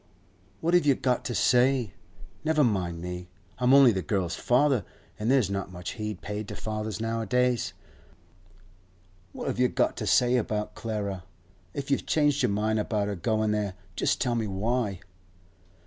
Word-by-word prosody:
'What 170 +2 0
have 175 - +5
you 140 - +5
got 125 -1 0
to 120 - -2
say? 125 -3 +3 0.5
Never 155 -1 +3
mind 90 -8 -1
me. 90 0 -5 0.3
I'm 125 0 +3
only 135 -3 +8
the 95 -3 -1
girl's 90 +1 -1
father, 125 -3 +2 0.4
an' 105 - -2
there's 125 -6 +3
not 95 -1 -3
much 90 -1 -6
heed 105 -3 -5
paid 105 0 -5
to - - -6
fathers 110 -1 -4
nowadays. 115 +2 0 1.6
What - - -7
have - - -2
you 125 - +5
got - - 0
to - - -3
say 125 +1 +4
about 105 -2 -2
Clara? 100 -5 -4 0.5
If 140 0 -4
you've 140 - 0
changed 145 -2 +2
your - - +2
mind 110 +2 0
about 105 -1 -1
her 100 - -2
goin' 110 +3 0
there, 105 -3 -1 0.2
just - - +1
tell 125 -2 +1
me 115 -2 -1
why. 105 0 -1
110 Hz, 165 wpm, -27 LUFS, 100-125 Hz, 1.6 s, only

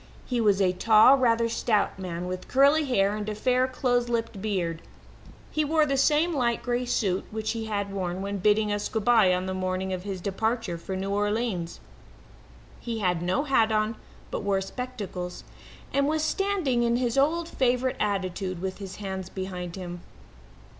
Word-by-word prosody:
He 245 -2 -1
was 205 -3 +3
a 190 -2 +3
tall, 220 +6 +6
rather 235 -3 +2
stout 225 -4 0
man, 180 -2 -4
with 185 0 -5
curly 285 +4 +4
hair 205 -6 +2
and 210 0 -4
a 210 - -3
fair, 255 +3 +2
close 245 -2 0
clipped 230 -4 -2
beard. 175 -6 -2 0.7
He 310 - +1
wore 310 +1 +3
the 275 -2 0
same 300 +5 +3
light 240 -5 0
grey 245 0 -1
suit 195 -6 0
which 220 0 -3
he 225 -1 -4
had 200 -2 -3
worn 185 -1 -3
when 200 0 -3
bidding 210 +2 +3
us 205 0 -2
good 220 -2 -2
bye 225 -6 +5
on 180 0 0
the 190 - -3
morning 185 0 -2
of 185 - -3
his 195 -1 -5
departure 200 -1 -2
for 190 +3 -5
New 195 +1 -3
Orleans. 205 -4 -1 1.0
He 235 -2 -4
had 180 -5 0
no 185 +11 0
hat 230 -6 +3
on, 215 +1 +1 0.4
but - - -2
wore 200 -1 +1
spectacles, 195 -5 -6 0.5
and 280 0 +2
was 310 0 0
standing 350 -8 0
in 235 0 +2
his 240 -1 0
old 320 +5 +2
favourite 255 -3 0
attitude, 185 -2 -2
with 190 +2 -4
his 190 -2 -7
hands 190 -2 -5
behind 180 -2 -5
him. 175 -2 -7
215 Hz, 180 wpm, -27 LUFS, 190-245 Hz, 1.0 s, tall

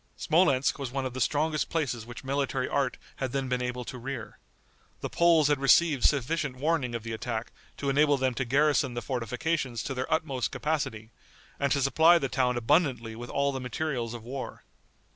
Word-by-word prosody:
Smolensk 145 -6 +2
was 135 -3 -3
one 135 0 -2
of 130 - -4
the 130 - -4
strongest 155 +4 +1
places 125 -9 -2
which 120 +2 -9
military 135 -1 -1
art 135 -3 0 0.2
had 130 -2 -3
then 135 -1 -1
been 125 0 -1
able 125 0 -3
to 125 - -7
rear. 125 -2 -6 0.6
The - - -4
Poles 165 -3 +4
had 145 -2 +2
received 140 +1 +4
sufficient 145 0 +1
warning 135 -3 0
of 115 - -4
the 115 -1 -5
attack 115 0 -4 0.3
to 140 - -4
enable 145 +1 +4
them 130 -1 0
to 130 - -1
garrison 140 0 +2
the 120 - -3
fortifications 130 0 -2
to 135 - -3
their 130 0 -4
utmost 140 -6 0
capacity 135 -8 -3 0.5
and 140 -1 +1
to 140 -1 +2
supply 160 +5 +6
the 135 -5 -2
town 125 -2 +1
abundantly 120 -3 +1
with 120 +1 -8
all 140 0 +1
the 130 -1 -4
materials 125 -2 -3
of 115 - -9
war. 130 +3 -6
135 Hz, 190 wpm, -28 LUFS, 125-145 Hz, 0.6 s, supply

